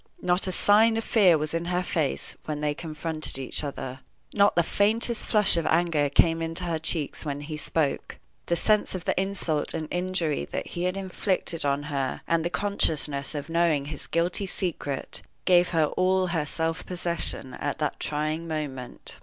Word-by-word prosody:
Not 180 +1 +2
a - - 0
sign 220 +4 +5
of 225 - -1
fear 190 -9 +5
was 155 +1 -3
in 165 0 -1
her 180 +1 0
face 160 -5 -1
when 150 -1 -3
they 150 0 0
confronted 155 -1 -2
each 135 +3 -1
other. 130 -2 -5 0.3
Not 200 0 +4
the 170 - +4
faintest 225 +6 +1
flush 210 -5 +4
of 165 - 0
anger 160 -3 +2
came 165 +3 +3
into 165 +2 -2
her 165 -2 -1
cheeks 160 -2 -1
when 145 -2 -4
he 155 +1 -6
spoke. 150 -1 -2 0.3
The 170 - +2
sense 210 +3 +2
of 180 - -6
the - - +2
insult 185 -6 -1
and 155 -1 -3
injury 175 -4 -1
that - - -5
he 175 +1 -3
had 185 +1 -1
inflicted 185 -3 -1
on 140 0 +1
her, 140 -3 -2
and 165 -1 +2
the 170 - 0
consciousness 155 -8 0
of 145 -1 -4
knowing 165 -4 +2
his 145 -1 -6
guilty 175 +4 +1
secret, 160 -7 -2 0.2
gave 180 -1 +5
her 160 -3 +3
all 185 +4 +1
her 165 -4 -1
self 165 +1 -2
possession 170 -7 -2
at 145 - -3
that 150 -1 -2
trying 155 +2 -2
moment. 140 -6 -5
165 Hz, 180 wpm, -26 LUFS, 150-180 Hz, 0.3 s, sign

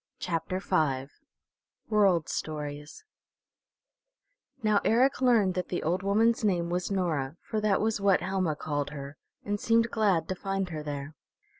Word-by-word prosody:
CHAPTER 170 +1 -2
V 145 -8 0 0.8
WORLD 195 -7 +3
STORIES 150 - -5 1.6
Now 210 -2 +3
Eric 255 +4 +3
learned 225 -7 +4
that 180 0 -3
the 175 - -2
old 175 +4 0
woman's 220 +4 +2
name 175 -4 +1
was 180 0 -1
Nora, 165 -7 -1
for 215 - -2
that 210 -2 +2
was 220 -1 0
what 195 -2 +4
Helma 185 -3 -1
called 145 -1 -3
her, 140 0 -8 0.3
and 205 0 -1
seemed 230 +1 +2
glad 200 -7 +2
to - - +1
find 195 0 -3
her 155 -3 -5
there. 145 0 -5
185 Hz, 145 wpm, -28 LUFS, 155-205 Hz, 1.6 s, learned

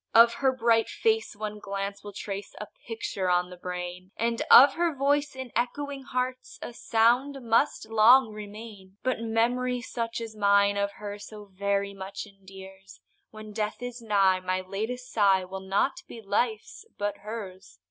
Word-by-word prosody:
Of 230 +1 +8
her 265 +1 +2
bright 230 -3 +2
face 445 - 0
one 210 0 -5
glance 200 0 -5
will 205 - -8
trace 200 0 -6
A 210 - -5 0.2
picture 200 -4 -3
on 180 0 +1
the - - -8
brain, 180 0 -6
And 230 0 0
of 275 +3 +9
her 340 -2 0
voice 285 +1 +1
in 260 -2 -7
echoing 275 +4 -2
hearts 255 -1 -3
A - - -7
sound 240 +5 +2
must 230 0 +1
long 225 +3 +6
remain; 205 -2 -10
But 255 -2 0
memory, 245 +2 0
such 230 -1 -4
as 225 -1 -7
mine 200 -1 +4
of 200 0 -1
her, 205 0 -7
So 210 0 -10
very 200 +1 -1
much 195 +1 -7
endears, 195 -1 -14 0.3
When 215 -1 -10
death 215 +2 -3
is 245 0 -6
nigh 195 -4 +3
my 185 0 -2
latest 220 +7 -4
sigh 195 -3 +3
Will 190 +1 -6
not 195 +8 0
be 235 - -9
life's, 220 - -2
but 205 0 -2
hers. 195 - -8
215 Hz, 165 wpm, -27 LUFS, 195-240 Hz, 0.3 s, of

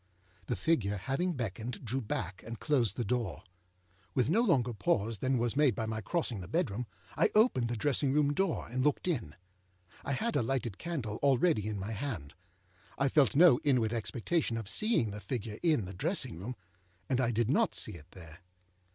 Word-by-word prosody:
The 120 - 0
figure, 105 - +1
having 135 - -1
beckoned, 120 - -5
drew 130 +4 -1
back, 105 -3 -4
and 115 0 -7
closed 125 -9 +1
the 120 - -1
door. 120 +2 -2 0.7
With 130 +3 +2
no 220 +6 +4
longer 130 - +2
pause 105 +1 0
than 130 +3 +1
was 120 0 0
made 140 -6 +4
by 110 - -2
my 110 0 -3
crossing 120 - -1
the 90 - -8
bedroom, 125 - -1 0.3
I - - +3
opened 215 - +4
the 120 - -2
dressing 140 +3 +2
room 145 0 +3
door, 190 +1 0
and 130 +2 -1
looked 150 +4 +1
in. 115 - -2 0.7
I 140 - -2
had 230 - -1
a - - +3
lighted 120 -4 -2
candle 135 -12 -3
already 140 - +3
in 105 -1 -3
my 100 +3 -4
hand. 105 - -4 0.6
I 135 +1 +2
felt 135 -5 +3
no 155 -5 +7
inward 125 -6 +2
expectation 120 +3 -1
of 110 -3 -5
seeing 210 - +1
the 105 +1 -7
figure 110 -4 -4
in 155 - +2
the 95 - -7
dressing 140 - -1
room, 120 +7 -5 0.5
and 130 -1 +1
I 120 - +2
did 120 -1 +1
not - - +2
see - - -1
it 75 -3 -12
there. 85 -2 -13
120 Hz, 190 wpm, -32 LUFS, 110-145 Hz, 0.7 s, no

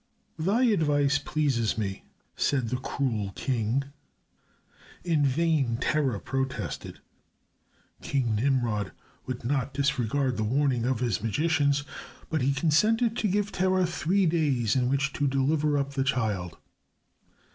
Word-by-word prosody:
"Thy 200 +10 +2
advice 145 - +3
pleases 135 -8 0
me," 100 -3 -3 0.3
said 130 -5 0
the 125 - -1
cruel 125 -7 -2
king. 125 0 0 1.2
In 160 -4 +1
vain 140 -4 +1
Terah 135 -4 0
protested. 135 +3 -4 1.0
King 125 -5 0
Nimrod 115 -4 0 0.3
would 125 -2 -5
not 135 +1 -1
disregard 135 -2 0
the 110 - 0
warning 125 +1 +1
of 130 -2 0
his 115 -7 0
magicians, 145 +4 +1 0.5
but 155 - 0
he 135 +2 +2
consented 215 - +2
to 215 - +1
give 205 +1 0
Terah 185 0 +2
three 175 +3 +1
days 145 -10 +1
in 125 -1 +2
which 140 +1 0
to 145 - 0
deliver 145 +2 +1
up 140 0 -2
the 135 -1 0
child. 105 -11 -1
140 Hz, 125 wpm, -27 LUFS, 120-155 Hz, 1.2 s, advice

